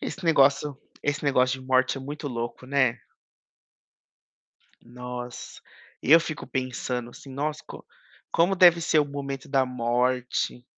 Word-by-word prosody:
Esse 190 - -6
negócio 140 -2 +3 0.2
esse 145 +1 -1
negócio 130 -1 +2
de 130 - -13
morte 130 +1 +2
é - - -8
muito 145 +2 -6
louco, 120 0 -5
né. 130 -3 +1 1.8
Nossa! 125 0 -8 0.4
Eu 160 +5 +7
fico 155 -2 -6
pensando, 125 -2 -3
assim: 135 - -13
"Nossa, 150 +3 -3
co - - -10 0.5
como 180 +4 +3
deve 175 -2 +7
ser 160 -1 +2
o 150 - +4
momento 140 -1 -6
da 135 -2 +2
morte?" 125 0 -1
135 Hz, 135 wpm, -26 LUFS, 125-145 Hz, 1.8 s, Eu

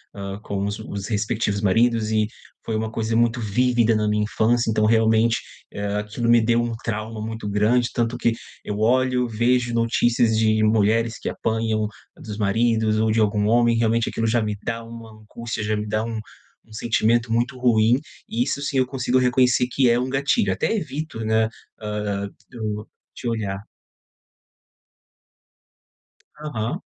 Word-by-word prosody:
hã, 100 0 -6
com 100 -1 -3
os 100 0 -3
os 100 -1 -6
respectivos 105 -1 -1
maridos 115 +2 +2
e 110 -1 +2 0.4
foi 110 - -2
uma 110 0 -2
coisa 115 0 -2
muito 120 +1 +2
vívida 115 +1 +2
na 105 0 +1
minha 105 0 +1
infância. 115 +2 +1
Então, 110 -1 +2
realmente, 110 +1 +3 0.3
eh, 100 0 -3
aquilo 105 +3 -2
me 120 0 +6
deu 115 +1 +2
um 120 0 -2
trauma 110 0 -4
muito 110 -2 -5
grande. 110 +4 +2
Tanto 120 0 -1
que 120 -1 +1 0.3
eu 105 0 -4
olho, 125 +2 +2
vejo 120 +2 +1
notícias 115 0 +2
de 110 0 +3
mulheres 110 +1 +2
que - - -3
apanham 110 -1 -1 0.3
dos 105 -1 -7
maridos 110 +1 +1
ou 110 0 +2
de 110 - +2
algum 105 -1 +1
homem, 120 +1 +3
realmente, 115 0 +1
aquilo 115 - -1
já 115 +1 +2
me 105 -1 -2
dá 115 0 -3
uma 115 -1 -10
angústia. 115 +1 -6
Já 110 +1 0
me 105 0 -4
dá 110 +1 0
um 115 -1 -4 0.5
um - - -15
sentimento 115 +1 +1
muito 120 +3 0
ruim. 120 -1 +4 0.3
E 120 - +1
isso 140 - -2
sim 140 -1 -2
eu 130 - +3
consigo 125 -1 0
reconhecer 125 -1 +3
que 130 -1 +3
é 120 - +4
um 130 +1 -2
gatilho. 135 -7 +1
Até 95 - -1
evito, 155 - -4
né, 110 0 +2 0.3
hã, 105 -1 -3 0.3
hum, 105 -2 -3 0.3
de 120 - -4
olhar. 100 -4 -3 2.8
Aham. 150 - -3
115 Hz, 165 wpm, -23 LUFS, 110-120 Hz, 2.8 s, me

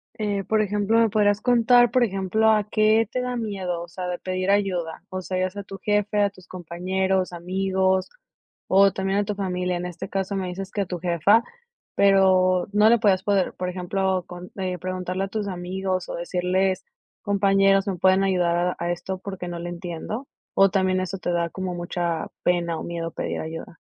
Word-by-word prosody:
Eh, 205 -2 -2
por 220 -1 +2
ejemplo, 210 +2 +1
me 225 -1 +4
podrías 205 -1 +2
contar, 245 -1 +5
por 250 0 +3
ejemplo, 205 +2 +1
¿a 215 -1 +3
qué 215 +1 +3
te 255 - -1
da 250 0 -3
miedo, 190 -7 -3
o - - -10
sea, 180 +2 -6
de 180 0 -2
pedir 185 +1 -3
ayuda? 185 -5 0
O 185 -1 -4
sea, 185 0 -3
es 185 +2 -6
a 200 - -5
tu 195 0 -9
jefe, 210 +1 +1
a 200 - +3
tus 185 -3 -18
compañeros, 185 +1 -1
amigos, 190 +1 0 0.6
o 195 +1 +5
también 195 +1 -1
a 205 - 0
tu 210 - -3
familia. 180 -2 -2
En 175 - -4
este 175 -1 -6
caso 195 +1 -2
me 190 -1 -2
dices 190 +2 -6
que 205 - -1
a - - 0
tu 175 -1 -5
jefa, 180 +6 +3 0.5
pero 185 -2 +4
no 210 +1 +5
le 235 - +6
podías 195 -4 +3
poder, 200 -3 +1
por 180 0 -3
ejemplo, 185 0 -1
con 180 0 -9
eh, 185 -2 -3
preguntarle 185 +1 -3
a - - -7
tus 210 0 -3
amigos, 185 0 -3
o - - -4
decirles: 185 +2 0 0.4
"Compañeros, 195 -1 +3
me 195 - -1
pueden 190 +2 +4
ayudar 180 -3 +2
a 180 +1 0
a 175 +1 -1
esto, 185 +2 -4
porque 190 -2 -6
no 175 -1 -5
le 175 +1 -5
entiendo". 175 +8 -6 0.3
O 195 0 +6
también, 185 0 +2
¿eso 185 +1 -4
te 175 - -2
da 170 -1 0
como 185 0 -4
mucha 175 -1 -2 0.2
pena 170 -2 +1
o - - -6
miedo 165 -1 -4
pedir - - -4
ayuda? 160 +1 -7
190 Hz, 200 wpm, -24 LUFS, 180-200 Hz, 0.6 s, le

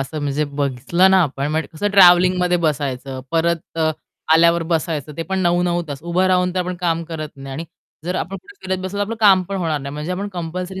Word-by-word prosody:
असं 135 +3 -4
म्हणजे 145 +1 0
बघितलं 145 +6 +1
ना 190 -1 +5
आपण 140 -2 -2
म्हणजे 155 -2 -1
कसं 205 +6 -2
ट्रॅव्हलिंगमध्ये 180 -1 +5
बसायचं 135 -4 -2
परत 170 +1 +2 0.2
अ, 160 -1 +2 0.4
आल्यावर 170 +1 +4
बसायचं, 160 -3 -2
ते 165 - -2
पण 190 +2 -3
9-9 175 -1 +1
तास. 140 +1 -6
उभं 175 +2 +1
राहून 180 -1 +2
तर - - 0
आपण 180 0 -3
काम 170 -1 0
करत 155 -2 -6
नाही 135 0 -8
आणि 160 +5 -5 0.4
जर 180 +2 -2
आपण 195 +2 -3
कुठे 400 - -15
फिरत 190 0 -1
बसलो, 190 +2 -4
तर - - +1
आपलं 225 +3 -3
काम 195 -3 +6
पण 195 - -3
होणार 165 -5 -1
नाही 140 0 -6
म्हणजे 150 +4 -4
आपण 195 +3 -3
कंपल्सरी 180 +2 -5
170 Hz, 215 wpm, -20 LUFS, 150-185 Hz, 0.4 s, काम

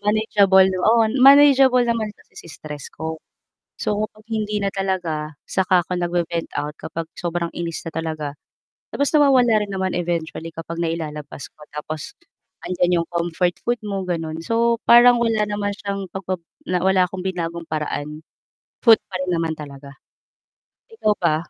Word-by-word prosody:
manageable, 205 -2 +4
oo, 200 +5 +3 0.2
manageable 270 -2 +7
naman 230 -2 -1
kasi - - -25
si - - -12
stress 150 -1 -9
ko. 160 0 -6 0.6
So, 210 +1 -1
kung 215 0 -21
hindi 215 -2 -2
na 200 - -1
talaga, 165 -6 -3
saka 185 -1 +2
ako 180 - -2
nag-ve-vent 175 -1 -2
out, 150 +1 -5
kapag 165 0 -6
sobrang 170 0 -2
inis 170 -1 -4
na 160 - -8
talaga, 160 -2 -3 0.7
tapos 285 - 0
nawawala 250 -7 +4
rin 200 - -9
naman 190 -2 -2
eventually, 165 -1 -3
kapag 165 0 -7
nailalabas 155 -2 -5
ko, 150 - -17
tapos, 155 - -6 0.6
andiyan 180 -1 +2
yung 165 - -5
comfort 175 +1 -1
food 240 0 0
mo, 200 -3 -4
gano'n. 165 -2 -4
So, 230 +2 +2
parang 240 +1 +7
wala 225 -3 +1
naman 205 -1 -2
siyang, 200 -2 -5
pagbab 185 -2 -4 0.2
na, 180 0 0
wala 190 -1 +3
akong 185 0 -7
binagong 170 -2 -3
paraan, 150 -1 -4 0.6
food 230 -3 +7
pa 185 -1 -5
rin 185 - -3
naman 165 -1 -1
talaga, 140 -2 -10 1.0
ikaw 215 - +1
ba? 170 -3 +1
180 Hz, 155 wpm, -21 LUFS, 165-210 Hz, 1.0 s, manageable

